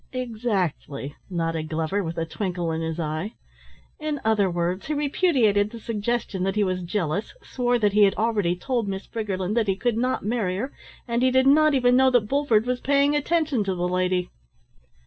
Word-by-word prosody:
"Exactly," 205 - -3
nodded 165 -3 -2
Glover 165 +5 -1
with 165 0 -5
a 165 - -1
twinkle 175 -1 -3
in 160 0 -2
his 160 0 -3
eye. 160 +7 -3 0.6
"In 305 -2 -3
other 210 -3 +3
words, 175 +4 -2
he 305 - -1
repudiated 270 - +2
the 230 - -9
suggestion 225 -2 -2
that 190 +1 0
he 210 - +2
was 185 -1 -1
jealous, 180 - -2
swore 245 -1 0
that 210 -3 +1
he 210 - +4
had 195 - +2
already 210 -6 +1
told 235 +3 -2
Miss 195 0 -4
Briggerland 200 -3 -3
that 230 -3 +1
he 195 - +2
could 235 +2 -1
not 250 -2 -1
marry 205 -5 -1
her, 260 +7 -4 0.3
and 235 0 0
he 260 - +4
did 260 +1 +3
not 305 +2 +5
even 245 -1 +4
know 260 +1 +5
that 245 -4 +2
Bulford 245 -5 +2
was 250 0 -1
paying 280 +1 +3
attention 295 -5 +1
to 190 -2 -2
the 175 0 -1
lady." 180 0 0
210 Hz, 190 wpm, -24 LUFS, 180-250 Hz, 0.6 s, not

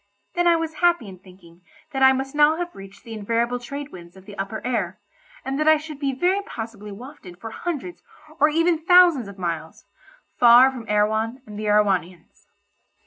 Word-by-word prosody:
Then 350 0 +1
I 340 - +5
was 325 -1 -3
happy 345 -10 +2
in 185 -2 -11
thinking 180 -2 -18 0.3
that 270 -2 -3
I 265 0 +7
must 265 +1 -3
now 295 +1 +4
have 350 0 -4
reached 195 0 -13
the 230 - -9
invariable 230 +3 -1
trade 280 +4 -7
wind 175 0 -13
of 190 - -16
the 205 -1 -11
upper 200 +2 -4
air, 210 -7 -2 0.5
and 270 +2 -3
that 305 - 0
I 315 0 +6
should 305 -1 -9
be 280 -2 -1
very 360 +9 0
possibly 225 - -8
wafted 195 -5 -12
for 225 +1 -8
hundreds 345 +4 -5 0.4
or 300 - +5
even 330 +1 +1
thousands 345 - +5
of 200 0 -11
miles, 165 -3 -5 0.5
far 245 +2 +7
from 245 -4 -10
Erewhon 220 +4 0
and 210 -2 -9
the 215 - -4
Erewhonians. 190 -4 -1
235 Hz, 190 wpm, -23 LUFS, 200-300 Hz, 0.5 s, I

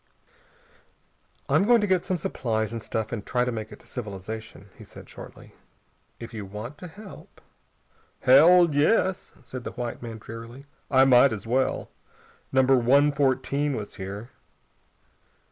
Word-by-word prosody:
"I'm - - +3
going 235 +3 +5
to - - +1
get 185 -3 +1
some 185 - -1
supplies 110 -7 -2
and 115 - -4
stuff 110 0 -4
and 110 -4 -4
try 125 +2 0
to 125 - -1
make 110 -1 -6
it 105 - -10
to - - -22
civilization," 105 -2 -8
he - - -13
said - - -13
shortly. - - -13 0.7
"If 115 0 -9
you 110 -2 -5
want 105 +9 -8
to 180 - -8
help...." 200 +4 -13 0.8
"Hell, 165 +5 +6
yes," 185 +5 +1
said 125 +1 -8
the - - -6
white 120 -1 -5
man 115 -2 -7
drearily. 115 +4 -10 0.2
"I 135 -1 +5
might 130 0 +6
as 110 -1 -5
well. 130 +3 -1 0.6
Number 130 0 +4
One 140 +5 +4
Fourteen 140 +1 0
was 105 -3 -6
here.... 100 +5 -7
125 Hz, 150 wpm, -25 LUFS, 110-145 Hz, 0.8 s, Hell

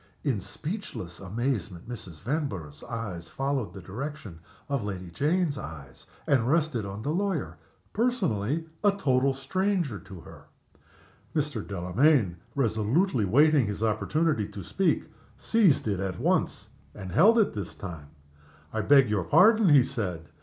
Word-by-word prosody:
In 130 -8 0
speechless 150 - -6
amazement 100 -3 -3
Mrs. 95 -10 -9
Vanborough's 100 - -3
eyes 95 -8 -5
followed 135 -7 -2
the 95 -1 -10
direction 110 - -7 0.3
of 140 -5 -1
Lady 95 -4 -5
Jane's 150 - 0
eyes 70 -6 -10 0.2
and 125 -4 +2
rested 150 -9 +1
on 100 +2 -6
the 145 - -1
lawyer, 160 - -2 0.3
personally 165 - 0 0.2
a 205 -1 +5
total 135 -8 +2
stranger 160 - -1
to 95 -3 -11
her. - - -14 0.9
Mr. 145 -7 -1
Delamayn, 100 - +2 0.2
resolutely 120 - +1
waiting 145 +4 +4
his 105 +1 -3
opportunity 115 +2 +1
to 100 - -8
speak, 165 - +1 0.3
seized 190 - +3
it 95 -3 -2
once - - 0 0.3
more - - -8
and 95 - -6
held 215 - +6
it 220 - +3
this 100 -3 -5
time. 80 -7 -8 0.7
"I - - 0
beg 140 -3 +6
your 100 -5 0
pardon," 215 - +5
he 140 -4 +7
said. 100 - -4
120 Hz, 140 wpm, -27 LUFS, 95-155 Hz, 0.9 s, he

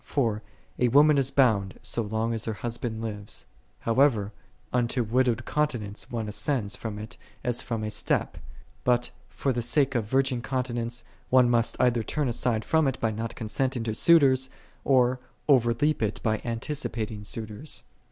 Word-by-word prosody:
For, 115 -7 0 0.2
" - - -29
a 125 - +4
woman 145 +4 +6
is 135 -1 +2
bound, 110 -9 +2
so 120 - -1
long 110 +2 -1
as 115 - 0
her 110 - -2
husband 115 0 -4
liveth."5 105 -2 -5 0.4
How 115 +2 0
ever 110 -8 +3 0.4
unto 125 0 +1
widowed 120 0 +1
continence 120 -9 -2
one 115 -3 -3
ascends 105 0 -1
from 110 -2 -5
it 110 +1 -8 0.3
as 120 -1 0
from 115 -2 -3
a 105 - -2
step: - - 0 0.4
but 125 -1 +2 0.2
for 135 - -1
the 120 - -1
sake 135 +3 +2
of 120 -4 0
virgin 130 +1 +1
continence, 120 -2 -2 0.3
one 125 -1 +5
must 115 -1 +1
either 120 -2 +3
turn 145 +5 -1
aside 115 -2 0
from 160 -2 +3
it 130 - -1
by 115 - +1
not 110 +1 -4
consenting 125 +2 -1
to 110 -1 -2
suitors, 130 -2 +5 0.3
or 130 -1 +3 0.3
over 125 -5 +5
leap 145 +5 +1
it 105 -2 -1
by 110 -1 +1
anticipating 115 -3 -3
suitors. 110 +7 -6
120 Hz, 170 wpm, -27 LUFS, 110-130 Hz, 0.4 s, woman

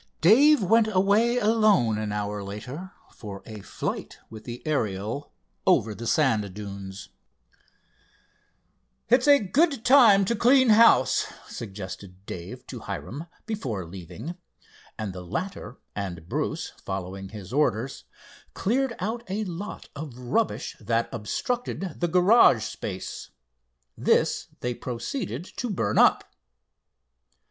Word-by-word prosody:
Dave 255 - +6
went 225 +4 +4
away 215 +4 +3
alone 210 - +3
an 105 -1 -3
hour 105 0 -3
later 125 - -7 0.2
for 100 -3 -9
a 110 -2 -9
flight - - -5
with 110 -1 -10
the 120 0 -8
Ariel 110 -3 -2 0.4
over 110 0 +3
the 115 +3 -6
sand 110 -10 +2
dunes. 100 -2 -8 2.0
"It's 250 +5 +4
a 285 -1 +8
good 275 - +1
time 230 -7 +7
to 235 - 0
clean 255 +3 +5
house," 215 - +5 0.2
suggested 95 -2 -8
Dave 85 -3 -8
to - - -8
Hiram, 150 +8 -6 0.2
before 130 - -3
leaving, 95 - -8 0.6
and 105 -4 -4
the 90 - -7
latter 165 - -5 0.2
and 90 -5 -5
Bruce, - - -2
following 95 0 -5
his 100 0 -9
orders, 130 -3 0 0.5
cleared 245 +3 0
out 225 +5 -3
a 205 +3 -1
lot 195 +2 -6
of 145 -4 -7
rubbish 125 - -1
that 115 0 0
obstructed 190 - -3
the 175 - +1
garage 180 - +5
space. 95 -2 -6 0.7
This - - +1
they 125 0 -1
proceeded 125 - -4
to 245 - -2
burn 110 - 0
up. - - +5
130 Hz, 120 wpm, -26 LUFS, -, 2.0 s, a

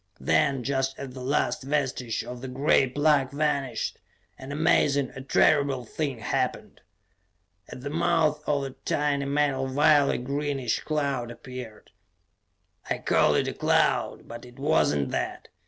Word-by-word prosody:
Then, 140 -4 +2
just 135 0 -1
as 140 - -6
the 130 - -9
last 140 +4 0
vestige 130 -4 -2
of 125 -1 -8
the 130 - -6
gray 135 +1 +2
plug 145 0 +2
vanished; 140 -5 -1 0.4
an 130 +1 -8
amazing, 145 -3 +2
a 130 - -9
terrible 140 -1 +2
thing 140 +1 -3
happened. 115 - -3 0.9
At - - -9
the 140 +2 -5
mouth 165 -2 +1
of 145 -2 +1
the 135 - -4
tiny 145 -1 0
metal 140 -2 0
vial 145 +1 +4
a - - 0
greenish 140 -1 -2
cloud 140 -6 -2
appeared. 120 -1 -10 1.0
I - - 0
call - - +2
it - - +1
a - - -2
cloud, - - +1
but 115 - -9
it 125 0 -14
was 150 +4 +2
not 70 -2 -1
that. - - -4
140 Hz, 150 wpm, -26 LUFS, 130-145 Hz, 1.0 s, vial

